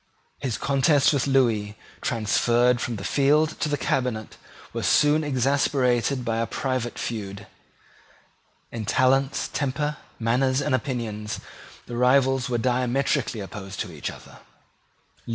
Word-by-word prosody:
His 130 -5 -2
contest 140 +1 +3
with 140 -1 0
Lewis, 115 -6 +2 0.3
transferred 120 +2 +2
from 120 - -2
the 100 - -7
field 150 +5 +2
to 155 - 0
the 145 - 0
cabinet, 125 -4 -2 0.4
was - - -2
soon 150 +1 +4
exasperated 135 -2 +1
by 115 -1 0
a 115 0 0
private 130 -3 -2
feud. 105 -3 -5 1.3
In 115 -2 -5
talents, 135 +4 +2
temper, 145 +2 -1 0.2
manners 130 +3 +1
and 145 -1 -1
opinions, 115 -5 -3 0.5
the 120 - -6
rivals 130 +1 +3
were 120 - 0
diametrically 125 0 0
opposed 95 0 -8
to - - -5
each - - -4
other. - - -12
125 Hz, 125 wpm, -25 LUFS, 115-140 Hz, 1.3 s, soon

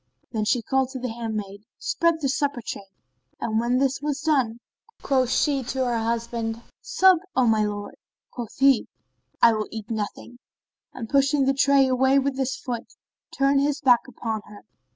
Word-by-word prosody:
Then 215 -3 -1
she 240 +1 +1
called 265 +2 +1
to 260 - -5
the 250 0 -3
handmaid, 215 -4 -5 0.2
"Spread 335 -1 0
the 280 - +1
supper 275 -2 -1
tray;" 195 - -6 0.5
and 220 -1 -1
when 240 +2 +1
this 270 +1 0
was 290 -1 -2
done 260 -7 +1 0.4
quoth 260 -3 +2
she 275 +1 +1
to 260 +1 -1
her 240 -2 0
husband 230 0 -2 0.2
"Sup, 380 -7 +4 0.2
O 255 - +3
my 220 -2 +3
lord." 205 -1 -4 0.4
Quoth 235 -3 -7
he, 270 -3 +4 0.6
"I 230 - +8
will 215 -1 -2
eat 220 0 -7
nothing," 220 +3 -5 0.5
and 230 -3 -7
pushing 275 +2 +2
the 270 - +3
tray 275 0 +4
away 265 +1 +3
with 275 0 +1
his 265 -1 -1
foot, 240 -3 -6 0.4
turned 275 0 +3
his 290 0 0
back 250 -2 +4
upon 225 -3 -4
her. 205 0 -14
255 Hz, 175 wpm, -24 LUFS, 225-275 Hz, 0.6 s, I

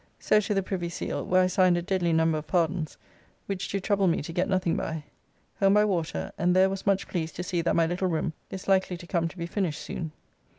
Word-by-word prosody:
So 215 - +4
to 210 0 -1
the 195 - +1
Privy 180 -2 -3
Seal, 170 - -3
where 185 0 +3
I - - +4
signed 185 -1 +3
a - - 0
deadly 180 -2 0
number 160 -1 +2
of 150 - -11
pardons, 170 -2 0 0.5
which 195 -1 -3
do 200 - -1
trouble 200 0 +1
me 165 - +1
to 165 - -6
get 180 +4 0
nothing 185 -3 +1
by. 160 -2 -3 0.6
Home 195 0 +5
by 210 0 +5
water, 165 - -2
and 180 +2 +3
there 190 +1 +5
was 195 0 -5
much 195 -1 +2
pleased 165 -3 -3
to 180 - -4
see 175 -1 -1
that 170 - +1
my 165 - +4
little 175 +3 -1
room 160 -1 -1 0.2
is 190 -1 -7
likely 190 -2 +2
to 175 - -11
come 170 -1 0
to 175 - -10
be 170 - -3
finished 170 -3 -2
soon. 160 -2 -5
180 Hz, 245 wpm, -27 LUFS, 165-190 Hz, 0.6 s, Home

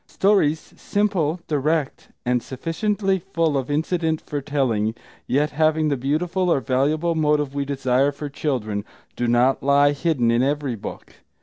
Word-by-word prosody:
Stories 175 -6 +1
simple, 185 -6 0
direct, 150 0 -1 0.2
and 125 0 +1
sufficiently 190 - -1
full 165 -4 -1
of 135 -1 -2
incident 160 +1 0
for 145 -1 -5
telling, 120 -7 0 0.3
yet 145 +3 +1
having 155 +1 +2
the 140 - +1
beautiful 170 +8 0
or 140 - +3
valuable 145 +6 +1
motive 150 -3 +1
we 140 0 -2
desire 135 0 +1
for 145 +1 -6
children, 120 -8 -2 0.3
do 120 - -1
not 120 +3 +3
lie 140 +1 +4
hidden 145 -5 +1
in 115 +1 +2
every 140 -1 0
book. 110 - -9
145 Hz, 145 wpm, -22 LUFS, 135-160 Hz, 0.3 s, lie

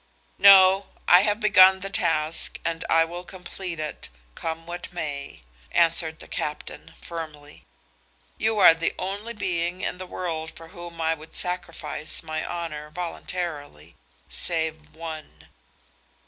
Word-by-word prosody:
"No; 195 0 +8 0.2
I 180 - +8
have 210 +1 +1
begun 190 -3 +6
the 195 +1 -4
task 160 -4 0
and 165 -1 -2
I 165 0 +5
will 175 +2 -7
complete 180 -1 -6
it, 155 - -5 0.2
come 165 - -5
what 175 +1 -7
may," 145 - -5 0.3
answered 165 -1 +2
the - - -11
captain, 150 0 -5
firmly. 155 -3 -9 0.7
"You 220 0 +1
are 195 - +9
the 165 0 -1
only 205 +5 -4
being 180 -2 -2
in 180 - -3
the 185 - -6
world 160 -3 -4
for 165 0 -13
whom 175 -2 -10
I 160 0 +1
would 160 0 -10
sacrifice 175 -3 0
my 155 0 -3
honor 160 -3 -5
voluntarily, 155 - -5 0.3
save 160 -2 -3
one." 160 -1 -9
170 Hz, 135 wpm, -25 LUFS, 160-185 Hz, 0.7 s, are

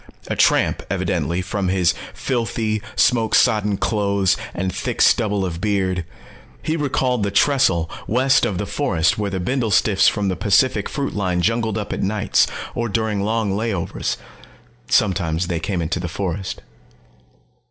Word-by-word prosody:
A - - -1
tramp, - - +3
evidently, 85 +3 -1
from 95 +1 -2
his 90 -2 +2 0.2
filthy, 115 -4 -2
smoke 115 -3 +3
sodden 105 -2 +3
clothes 100 -3 +1 0.2
and 95 +1 -2
thick - - -4
stubble 105 -4 +3
of 85 -2 -5
beard. 95 -4 0 0.6
He 160 - -1
recalled 130 -5 0
the 100 - 0
trestle 100 - +2 0.2
west 130 +4 +3
of 95 - 0
the 105 - -2
forest 100 - 0
where 105 -1 -1
the 95 -1 -3
bindlestiffs 110 -1 +2
from 105 -2 -2
the 95 - 0
Pacific 105 +2 +2
Fruit 140 -2 -3
line 90 -4 -1
jungled 115 0 0
up 105 -2 -4
at - - -3
nights, 105 +1 +2 0.3
or 120 -1 -2
during 110 -1 -1
long 110 0 0
layovers. 100 -3 -2 0.7
Sometimes 90 -4 +1
they 85 -2 -2
came 90 -2 -2
into 85 +3 -2
the 90 - -3
forest. 95 +2 -4
100 Hz, 150 wpm, -21 LUFS, 95-115 Hz, 0.7 s, tramp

